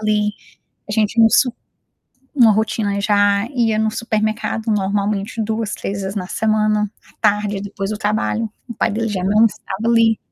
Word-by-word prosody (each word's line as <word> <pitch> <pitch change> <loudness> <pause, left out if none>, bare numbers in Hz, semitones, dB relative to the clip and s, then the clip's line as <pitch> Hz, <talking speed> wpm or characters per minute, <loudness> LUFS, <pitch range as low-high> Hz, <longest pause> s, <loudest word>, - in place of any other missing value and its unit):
ali, 210 -1 +1 0.6
a 205 - -3
gente 215 0 0
ia 230 - +7
no 225 - +5
su 250 -2 +4 0.8
uma 235 -6 +6
rotina 205 -1 0
já 205 0 +2
ia 230 -4 +1
no 220 0 +1
supermercado 220 0 -2
normalmente 205 +2 -1
2, 220 0 -2
3 200 0 -4
vezes 190 +1 -4
na 185 -2 -4
semana 215 -1 +1 0.2
à - - -24
tarde, 210 -1 +1
é - - -6
depois 200 0 -5
do 215 - -3
trabalho, 215 +1 -1 0.2
o 235 - -6
pai - - 0
dele 225 +2 -1
já 190 -3 -2
não 210 +3 +5
estava 210 0 -5
ali. 230 -1 +4
215 Hz, 180 wpm, -19 LUFS, 205-220 Hz, 0.8 s, ia